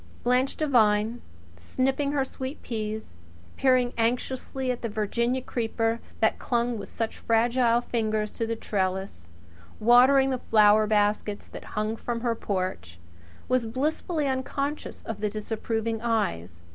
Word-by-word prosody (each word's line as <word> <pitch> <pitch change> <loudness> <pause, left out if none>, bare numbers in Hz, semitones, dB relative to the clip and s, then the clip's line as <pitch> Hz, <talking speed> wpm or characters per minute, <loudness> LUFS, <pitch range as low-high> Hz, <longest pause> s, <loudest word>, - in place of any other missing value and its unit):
Blanche 250 +2 +2
Devine 230 -5 +2 0.4
snipping 265 - -1
her 280 -2 +1
sweet 265 +2 -7
peas; 215 - -4 0.4
peering 255 -2 +3
anxiously 255 +2 -1
at 245 - -4
the 230 - -2
Virginia 235 +4 -1
creeper 225 -1 -1 0.2
that 220 - +2
clung 235 -2 0
with 200 - -8
such 225 -1 -4
fragile 235 +1 +3
fingers 215 -3 -1
to 230 - -3
the 230 - -1
trellis; 190 - -3 0.5
watering 260 +4 +6
the 255 - -1
flower 215 -1 +5
baskets 210 0 +1
that - - -10
hung 215 +1 0
from 230 0 -4
her 235 -1 +1
porch 185 - -3 0.5
was 255 -2 +1
blissfully 295 +5 -1
unconscious 275 +2 -3
of 225 -2 -5
the 210 - +1
disapproving 225 +1 -3
eyes. 85 - -1
230 Hz, 135 wpm, -27 LUFS, 215-255 Hz, 0.5 s, watering